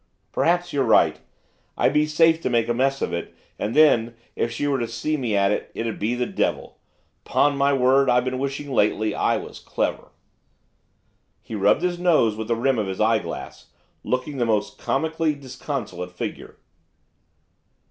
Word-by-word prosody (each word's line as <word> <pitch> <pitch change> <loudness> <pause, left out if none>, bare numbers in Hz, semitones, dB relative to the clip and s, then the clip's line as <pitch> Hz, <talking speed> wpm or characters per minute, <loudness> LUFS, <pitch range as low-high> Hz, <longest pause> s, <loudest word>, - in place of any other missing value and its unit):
Perhaps 175 +1 +1
you're 140 -2 +2
right. 115 - +3 0.6
I'd - - +2
be 150 0 +3
safe 160 +1 +3
to - - -1
make 120 -2 +1
a 120 - +1
mess 135 +3 0
of - - -2
it, 85 - -5 0.2
and 105 - -2
then, 120 -7 +4 0.2
if 115 - -1
she 130 - -3
were 140 -2 +1
to 120 - -2
see 120 +7 -2
me 120 -7 -1
at 100 0 +3
it, 105 - -2
it'd 115 0 -3
be 110 +4 0
the 125 0 -1
devil! - - -2 0.4
'Pon 145 0 +2
my 140 0 +2
word, 135 0 +3
I've 125 0 +3
been 130 0 -2
wishing, 140 +1 -4
lately, 105 -1 +1
I - - +1
was - - -8
clever.' - - -3 1.3
He - - -10
rubbed 105 - +2
his 175 -1 -1
nose 155 -12 +3
with 110 0 -5
the 115 - +1
rim 125 +1 +1
of 105 - -1
his 95 -1 -5
eyeglass, 110 +1 -1 0.4
looking 130 +3 -2
the 120 - +1
most 105 -2 -1
comically 160 +1 0
disconsolate 130 - -6
figure. 90 - -6
125 Hz, 175 wpm, -23 LUFS, 110-145 Hz, 1.3 s, then